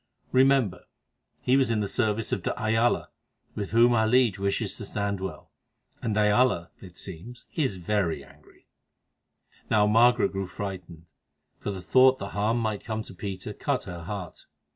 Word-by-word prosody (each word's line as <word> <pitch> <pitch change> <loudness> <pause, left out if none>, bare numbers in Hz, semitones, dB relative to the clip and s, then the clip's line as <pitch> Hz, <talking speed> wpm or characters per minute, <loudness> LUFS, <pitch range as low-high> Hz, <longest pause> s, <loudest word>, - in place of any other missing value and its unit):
Remember, 130 -7 +3 0.6
he 125 - +3
was 135 -3 +3
in 115 -2 +1
the 105 - -1
service 110 -1 -1
of 100 - -1
de - - -3
Ayala, 115 +1 +1 0.4
with 100 -2 -4
whom 120 +2 +5
our 110 -1 +3
liege 120 -5 +3
wishes 100 0 -1
to - - -6
stand 100 -1 -2
well, 95 -5 -7 0.5
and 110 -2 -1
de 105 - +3
Ayala, 105 -4 +2
it 90 -3 -13
seems, 100 +7 -10
is 135 -10 0
very 90 -5 -1
angry." - - -21 1.0
Now 105 -2 +4
Margaret 120 +3 +4
grew 95 -1 -3
frightened, 90 -4 -7 0.5
for - - -4
the 95 -2 -5
thought 130 +5 +5
that 100 - -6
harm 105 +3 0
might 110 -3 -2
come 110 0 -3
to - - -12
Peter 95 +1 -6
cut 140 +3 -1
her 90 -2 -7
heart. 100 -3 -7
105 Hz, 165 wpm, -27 LUFS, 95-120 Hz, 1.0 s, whom